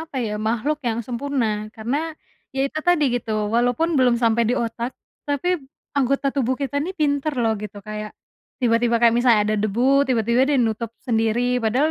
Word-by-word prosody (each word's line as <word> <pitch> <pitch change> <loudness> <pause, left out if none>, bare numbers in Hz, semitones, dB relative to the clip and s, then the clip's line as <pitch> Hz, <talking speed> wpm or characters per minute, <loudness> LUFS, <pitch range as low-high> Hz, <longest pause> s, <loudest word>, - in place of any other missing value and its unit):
apa 320 -4 -8
ya 210 - -3 0.2
makhluk 270 +7 0
yang 230 0 -1
sempurna 255 0 -1 0.3
karena, 230 +5 -2 0.6
ya 270 - -1
itu 310 - -5
tadi 350 -4 +4
gitu 230 -2 -6 0.2
walaupun 245 +7 +2
belum 250 -2 +4
sampai 230 0 +3
di - - +2
otak, 235 +2 -4 0.4
tapi 285 +5 -1 0.5
anggota 275 +1 +1
tubuh 260 -2 +1
kita 280 0 -3
ini 365 - -3
pintar 290 0 +1
loh 225 -1 +2
gitu 210 -1 -7
kayak, 215 0 -5 0.5
tiba-tiba 235 0 +2
kayak 235 -1 +5
misalnya 240 -3 +4
ada 215 - +1
debu 215 +3 0 0.3
tiba-tiba 235 0 +2
dia 285 -3 +2
nutup 220 +1 -3 0.2
sendiri 225 -1 +1 0.2
padahal 260 +8 +2
240 Hz, 170 wpm, -22 LUFS, 225-275 Hz, 0.6 s, kayak